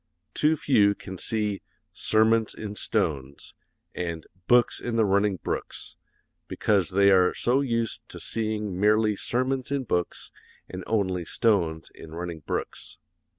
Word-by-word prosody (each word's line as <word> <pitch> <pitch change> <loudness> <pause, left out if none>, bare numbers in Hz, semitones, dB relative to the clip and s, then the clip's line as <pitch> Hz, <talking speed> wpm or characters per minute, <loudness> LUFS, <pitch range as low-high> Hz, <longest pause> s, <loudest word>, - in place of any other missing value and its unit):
Too 155 +1 +3
few 105 -9 +3
can 95 -3 -9
see 105 -3 -1 0.3
'sermons 110 0 +2
in 105 -2 -6
stones' 70 -8 -2 0.4
and 85 -2 -4 0.2
'books 120 -1 +4
in 120 -1 -3
the 110 -1 +3
running 100 0 +2
brooks,' - - -5 0.5
because 100 -3 +1
they 100 +1 +4
are 90 -1 +4
so 125 +3 +2
used 115 -4 -2
to - - -9
seeing 105 -4 -2
merely 105 +1 +3
sermons 130 +4 -1
in 140 -1 -1
books 90 -7 -2 0.4
and 95 0 -7
only 95 -5 0
stones 85 -6 0
in 80 0 -11
running 85 -1 -5
brooks. 75 - -5
105 Hz, 135 wpm, -26 LUFS, 90-115 Hz, 0.5 s, books